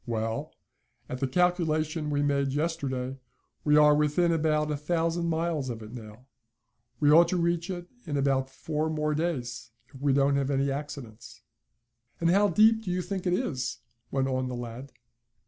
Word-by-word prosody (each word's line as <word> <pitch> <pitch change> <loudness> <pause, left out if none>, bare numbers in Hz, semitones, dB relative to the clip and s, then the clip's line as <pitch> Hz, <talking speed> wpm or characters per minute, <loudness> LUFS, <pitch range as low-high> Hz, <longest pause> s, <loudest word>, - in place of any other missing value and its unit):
"Well, 115 -1 -2 0.6
at 125 - -5
the 135 - 0
calculation 160 -1 +1
we 145 -1 +1
made 140 -1 +1
yesterday, 135 -4 -2 0.4
we 150 0 +4
are 150 0 +7
within 150 +4 +2
about 155 -2 +1
a - - 0
thousand 165 +3 -1
miles 160 -4 -1
of 115 -2 -5
it 105 - -10
now. 110 0 -10 0.7
We 145 -1 +4
ought 165 +2 +7
to 180 - 0
reach 170 +1 0
it 175 -2 -5 0.2
in 145 -2 -1
about 135 -1 +1
four 155 +3 -3
more 150 -1 0
days, 125 -7 -3 0.2
if 135 - -12
we 145 -1 +2
don't 140 +1 +3
have 140 -1 0
any 140 0 +1
accidents." 120 -6 -7 0.8
"And 170 0 +3
how 200 +2 +4
deep 220 +2 +5
do 210 - -6
you 180 0 -1
think 185 +1 -4
it 175 - +2
is?" 145 - -2 0.3
went 135 -1 0
on 130 -1 -1
the 125 - -4
lad. 120 +3 -7
150 Hz, 175 wpm, -28 LUFS, 130-170 Hz, 0.8 s, are